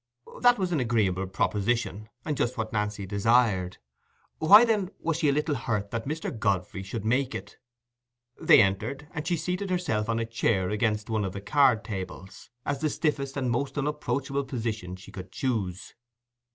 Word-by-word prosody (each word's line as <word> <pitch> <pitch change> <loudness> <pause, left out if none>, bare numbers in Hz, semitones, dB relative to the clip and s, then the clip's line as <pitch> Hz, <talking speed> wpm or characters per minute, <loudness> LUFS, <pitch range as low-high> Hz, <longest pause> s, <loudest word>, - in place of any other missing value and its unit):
That 245 0 +6
was 185 -3 -1
an 160 - +1
agreeable 105 -6 +1
proposition, 105 +2 -1 0.2
and 150 - -1
just 125 -1 -1
what 110 -1 -3
Nancy 105 -1 -1
desired; 100 -2 +2 0.6
why, 205 +9 +8
then, 210 -5 +1
was 165 -1 -1
she 155 -4 +3
a - - +4
little 150 +2 0
hurt 110 -6 -2
that 115 +1 -3
Mr. 155 -3 -3
Godfrey 100 -4 -1
should 100 +3 -5
make 125 +3 +1
it? 100 +2 -8 0.8
They - - +7
entered, 110 +9 -2
and 150 +1 -5
she 175 - +1
seated 180 +5 -3
herself 175 -13 -1
on 115 - +1
a 115 - -1
chair 110 -4 0
against 105 -1 0
one 110 -1 +1
of 95 -2 -3
the 100 - -5
card 115 +1 +3
tables, 95 -1 -7 0.2
as 140 0 -2
the 155 - +1
stiffest 140 -3 -1
and 130 -3 0
most 135 +4 -2
unapproachable 140 -1 -1
position 110 -8 -4
she 95 +2 -13
could 95 0 -9
choose. 100 -8 -3
115 Hz, 175 wpm, -27 LUFS, 100-140 Hz, 0.8 s, why